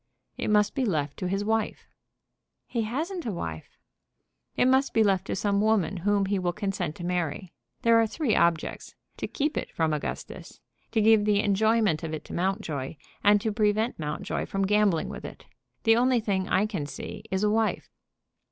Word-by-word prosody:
"It - - -3
must 210 -1 +3
be 270 - -1
left 150 - -1
to 185 - -3
his 195 +2 -1
wife." 220 0 -1 0.8
"He 235 - -2
hasn't 315 - -3
a - - -1
wife." 80 - -6 0.8
"It - - +4
must 265 +2 +3
be 225 - +5
left 195 -2 +1
to - - -2
some 200 0 +1
woman 210 -3 +2
whom 200 +2 +1
he 195 0 0
will 175 -1 -1
consent 195 -6 -3
to 175 - -8
marry. 175 0 -2 0.3
There 230 0 +5
are 225 - +2
three 255 0 0
objects: 170 -1 0 0.2
to - - -3
keep 295 +2 -1
it - - -3
from 160 -2 0
Augustus; 150 - -6 0.3
to 220 - +3
give 215 -1 +5
the 205 -1 +3
enjoyment 210 -3 +2
of 160 -1 -3
it 155 - -9
to - - -9
Mountjoy; 170 -7 -2 0.3
and 205 0 +6
to 220 - -1
prevent 215 +1 +1
Mountjoy 150 -1 -3
from 195 0 -1
gambling 205 -4 +2
with - - -7
it. - - -9 0.4
The 225 -1 +5
only 250 0 +3
thing 195 -4 -1
I 195 - +3
can 190 -10 -3
see - - -8
is 190 +1 -1
a 210 - +3
wife." 220 0 0
205 Hz, 190 wpm, -27 LUFS, 180-220 Hz, 0.8 s, and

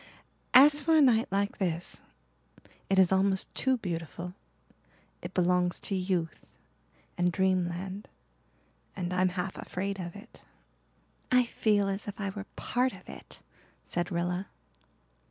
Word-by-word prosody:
As 290 +3 +8
for 320 +2 +3
a - - +6
night 240 -4 +4
like 200 +1 -1
this, 175 -3 -2 0.9
it 195 - +2
is 190 -1 +5
almost 190 0 +1
too 260 -1 +2
beautiful 175 -2 -5 0.9
it - - -8
belongs 180 0 +2
to - - -3
youth 180 -3 -2 0.7
and 175 0 +3
dreamland 185 +1 -1 0.9
and 180 -1 -3
I'm 185 0 +3
half 185 +1 -4
afraid 195 +1 -4
of 175 0 -6
it." 210 +4 -13 0.9
"I 250 0 +6
feel 210 -4 +1
as 195 +1 -3
if 205 - -6
I 200 -1 -2
were 195 +1 -7
part 250 +1 0
of - - -14
it," - - -11 0.4
said 175 0 -2
Rilla. 175 +2 -1
190 Hz, 135 wpm, -29 LUFS, 180-205 Hz, 0.9 s, As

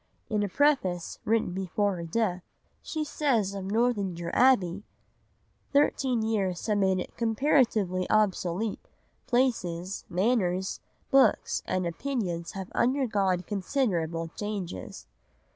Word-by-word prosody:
In 210 -1 +1
a 205 - -1
preface 190 - +1
written 220 -4 +1
before 195 +1 -1
her 170 - -5
death, 185 0 0 0.4
she 310 -1 -3
says 250 -10 0
of 195 -1 -5
Northanger 200 -6 0
Abbey—Thirteen 250 +4 0
years 195 -5 -1
have 210 -2 +1
made 190 -1 +3
it - - -6
"comparatively 225 -6 +1
obsolete, 210 -1 0 0.4
places, 200 -8 0
manners, 190 -1 0 0.3
books, 270 0 +3
and 185 -1 0
opinions 175 -3 -3
have 190 -2 -6
undergone 215 -8 +1
considerable 180 - -1
changes." 195 - -6
200 Hz, 105 wpm, -28 LUFS, 180-235 Hz, 0.4 s, made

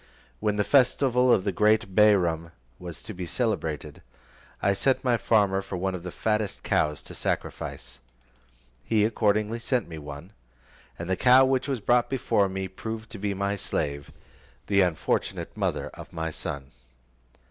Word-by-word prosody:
When 105 -1 0
the 105 - +2
festival 125 0 +3
of 95 - +4
the 100 - 0
great 105 0 +2
Bairam 85 -6 +3 0.3
was 85 -4 -8
to 110 - -7
be 90 -2 -6
celebrated, 80 - -2 0.6
I 100 - +2
sent 130 +7 +1
to - - -17
my 125 -1 +4
farmer 100 -2 +2
for 95 -1 -6
one 95 +1 -1
of 90 - -5
the 90 - -6
fattest 105 +2 -2
cows 75 -1 0
to - - -10
sacrifice. - - -4 0.8
He 110 -2 +2
accordingly 110 0 +1
sent 120 -1 -1
me 80 -2 -8
one, 75 +5 -9 0.7
and 85 - -6
the 95 - +1
cow 125 +5 +6
which 130 0 +1
was 135 -5 -2
brought 120 +4 +2
me 95 -7 0
proved 110 +4 -7
to 105 - -7
be 100 0 -2
my 100 +1 -1
slave, 70 -7 -3 0.5
the 100 -1 +3
unfortunate 90 -4 -1
mother - - -1
of - - -12
my 80 0 -3
son. 70 -3 -6
100 Hz, 160 wpm, -26 LUFS, 85-110 Hz, 0.8 s, cow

